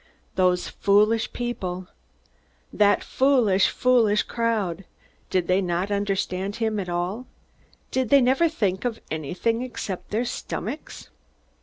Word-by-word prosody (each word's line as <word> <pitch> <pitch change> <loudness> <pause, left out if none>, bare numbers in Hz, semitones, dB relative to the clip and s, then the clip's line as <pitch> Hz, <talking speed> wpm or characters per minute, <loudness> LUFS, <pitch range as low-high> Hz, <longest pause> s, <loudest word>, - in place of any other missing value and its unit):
Those 180 -1 +2
foolish 210 +3 +2
people! 185 -7 -4 0.9
That 205 -1 +3
foolish, 245 -8 +3
foolish 230 -5 +3
crowd! 215 -7 -1 0.5
They 185 - +2
did 185 +3 +1
not 180 +3 -1
understand 195 -1 -1
him 220 -2 -1
at 185 -2 -4
all. 180 +8 -3 0.6
Did 260 -3 0
they 280 - +7
never 265 +6 +3
think 195 - -1
of 240 -3 -2
anything 175 - -1
except 220 -7 -5
their 225 +4 0
stomachs? 250 +2 -6
205 Hz, 120 wpm, -24 LUFS, 185-240 Hz, 0.9 s, they